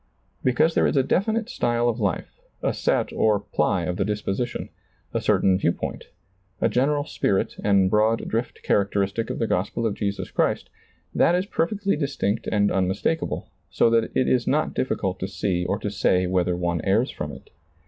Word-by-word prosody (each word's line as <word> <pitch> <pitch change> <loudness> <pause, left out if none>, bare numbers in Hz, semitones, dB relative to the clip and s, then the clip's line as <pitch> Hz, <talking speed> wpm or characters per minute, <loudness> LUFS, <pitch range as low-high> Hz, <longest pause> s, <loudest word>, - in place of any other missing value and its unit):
Because 145 +6 +3
there - - +3
is - - 0
a 135 - +4
definite 220 - 0
style 120 - 0
of 120 0 0
life, 100 -6 -2 0.2
a - - +1
set - - 0
or 105 -2 +3
ply 90 -3 0
of 90 +1 -2
the 95 - +1
disposition, 105 +3 -3 0.4
a - - 0
certain 95 -1 +3
view 85 - +2
point, - - -5 0.5
a - - +3
general 145 +3 +1
spirit 100 -9 0
and 100 -2 +4
broad 110 +3 +2
drift 115 +2 -3
charac 100 -1 +2
teristic 100 +3 -1
of - - -3
the 115 - 0
gospel 110 +4 -1
of 110 - +1
Jesus 100 -1 -3
Christ, - - 0 0.4
that 170 - +4
is 180 +1 0
per 165 -4 0
fectly 200 -5 -1
distinct 120 -7 -1
and 100 -1 +2
unmistakable, 95 - -1 0.2
so 115 - +3
that 115 -1 +3
it 130 - +2
is 125 -2 +2
not 150 +2 +1
dif 130 - -1
ficult 95 -2 -2
to 95 - -2
see 95 -2 -1
or 100 - 0
to 105 -1 -4
say 90 -2 +2
whether 90 -1 +1
one 85 -2 -1
errs 110 +6 +2
from - - -5
it. - - -13
105 Hz, 190 wpm, -24 LUFS, 95-125 Hz, 0.5 s, a